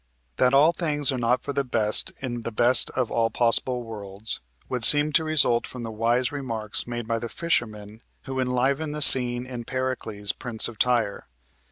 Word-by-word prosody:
That 125 +1 +2
all 150 +4 +4
things 150 -5 0
are 130 - -4
not 120 +2 -1
for 140 - -5
the 140 - -1
best 110 -4 +2
in 120 -3 -5
the 115 - -6
best 120 +3 +3
of 125 -3 -2
all 115 -1 0
possible 120 +2 0
worlds 105 -1 -5 0.3
would 125 -2 -5
seem 150 +3 +3
to 160 - +2
result 150 -7 +2
from 125 -2 -9
the 115 - -7
wise 120 +3 -1
remarks 115 -8 -4
made 120 -2 -6
by 115 0 -2
the 120 0 -7
fishermen 110 -10 -4 0.2
who 130 0 -6
enliven 135 +4 -1
the 150 -1 +1
scene 125 -2 +7
in 125 -2 -8
"Pericles, 115 -5 -4
Prince 120 -3 0
of 115 -3 -12
Tyre." 120 -5 -1
120 Hz, 185 wpm, -23 LUFS, 115-130 Hz, 0.3 s, scene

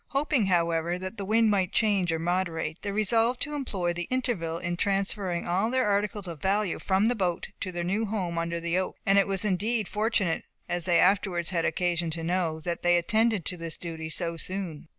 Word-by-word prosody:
Hoping, 275 -6 +1
however, 170 -1 +1
that 185 +4 -6
the 200 - -4
wind 220 +1 +3
might 190 -3 +1
change 200 -6 +2
or 165 - 0
moderate, 165 -2 -2
they 200 - -3
resolved 225 +4 +2
to 295 - -1
employ 195 -12 -2
the 175 0 -4
interval 235 -11 -1
in 175 0 -2
transferring 195 -2 0
all 190 +6 +1
their 255 -2 +1
articles 205 0 0
of 165 -5 -7
value 195 0 +1
from 195 +2 +2
the 245 - +3
boat, 180 -6 -1
to 185 - -3
their 175 -1 -3
new 200 +6 0
home 185 -5 -2
under 170 0 -2
the 170 +2 0
oak. 185 - -3
And 195 0 +5
it 195 - +2
was 195 +1 0
indeed 210 +2 0
fortunate, 210 -5 0 0.2
as 175 -1 -2
they 175 -2 +3
afterwards 185 -2 +2
had 170 -2 0
occasion 175 -2 0
to 165 - -5
know, 170 -2 0
that 170 +1 -3
they 175 0 +4
attended 220 +1 +2
to 180 - -3
this 165 -2 -4
duty 160 -2 -6
so 170 +1 -2
soon. 175 -3 -5
185 Hz, 210 wpm, -27 LUFS, 170-210 Hz, 0.2 s, And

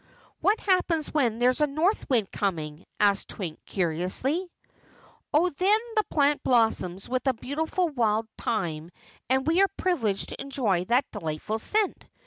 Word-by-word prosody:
"What 420 +3 +2
happens 360 -5 +1
when 245 -7 +1
there's 250 +4 +2
a 300 - +4
north 320 +9 0
wind 230 -7 +1
coming?" 160 -4 -3
asked 200 -1 +3
Twink 170 -7 -6
curiously. 190 - 0 0.8
"Oh, 330 +5 +3
then 390 +8 +3 0.2
the 430 - +3
plant 290 -1 +2
blossoms 220 -7 +1
with 255 +2 -2
a 260 - +3
beautiful 320 +9 -1
wild 225 -6 0
thyme 170 -8 -2 0.4
and 265 +1 +2
we 330 +4 +3
are 390 - +4
privileged 225 - 0
to - - -6
enjoy 225 -10 0
that 245 +7 +2
delightful 190 +3 -3
scent. 420 - -1
250 Hz, 145 wpm, -27 LUFS, 195-315 Hz, 0.8 s, a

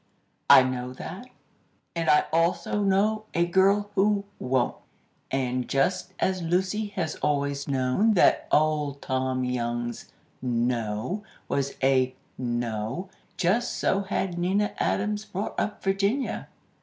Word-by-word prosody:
"I 130 - +10
know 125 -1 -3
that, 190 - -8 0.7
and 165 -1 0
I 150 - +6
also 170 +5 +1
know 205 +2 +2
a 170 +1 +3
girl 195 +3 +3
who 205 0 +2
won't! 125 -1 0 0.5
and, 130 -2 -1
just 185 +7 0
as 185 -1 0
Lucy 185 +5 0
has 160 -4 -2
always 140 -1 -1
known 140 - +2
that - - +4
Old 150 -2 +2
Tom 130 0 -1
Young's 120 -1 -3 0.3
'no' 120 - -1 0.3
was 140 0 -1
a 130 -1 +3 0.2
no, 120 - -3 0.3
just 200 +7 +1
so 195 - +1
had 190 -2 -2
Nina 195 +4 +1
Adams 210 +1 0
brought 205 0 -4
up 210 - -3
Virginia." 200 +7 0
165 Hz, 120 wpm, -26 LUFS, 130-195 Hz, 0.7 s, I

